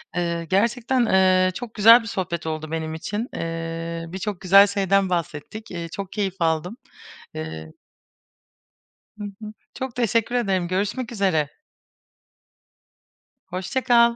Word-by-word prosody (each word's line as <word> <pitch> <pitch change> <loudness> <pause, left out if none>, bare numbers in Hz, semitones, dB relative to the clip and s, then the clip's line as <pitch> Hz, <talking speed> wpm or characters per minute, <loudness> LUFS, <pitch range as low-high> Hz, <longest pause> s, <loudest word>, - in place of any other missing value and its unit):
Eee, 170 -1 -1
gerçekten, 235 +5 +2
eee, 185 -2 +4
çok 235 +2 -7
güzel 230 +3 +8
bir 225 - -9
sohbet 175 -5 -3
oldu 155 0 -4
benim 160 -1 -3
için. 205 +8 -4
Eee, 165 0 -4
birçok 190 +2 -5
güzel 195 +2 +7
şeyden 195 -1 +1
bahsettik, 175 +5 -4
eee, 170 -2 -5
çok 195 +2 -6
keyif 195 -3 -2
aldım. 165 +6 0 0.6
Eee 80 0 -6 1.5
Hı 210 - -7
hı. 205 +1 -8 0.2
Çok 260 -2 -5
teşekkür 230 0 +1
ederim, 195 -7 +1
görüşmek 205 +7 -2
üzere. 185 -9 +1 2.0
Hoşça 185 +9 -2
kal. 235 -1 +5
190 Hz, 125 wpm, -23 LUFS, 170-220 Hz, 2.0 s, güzel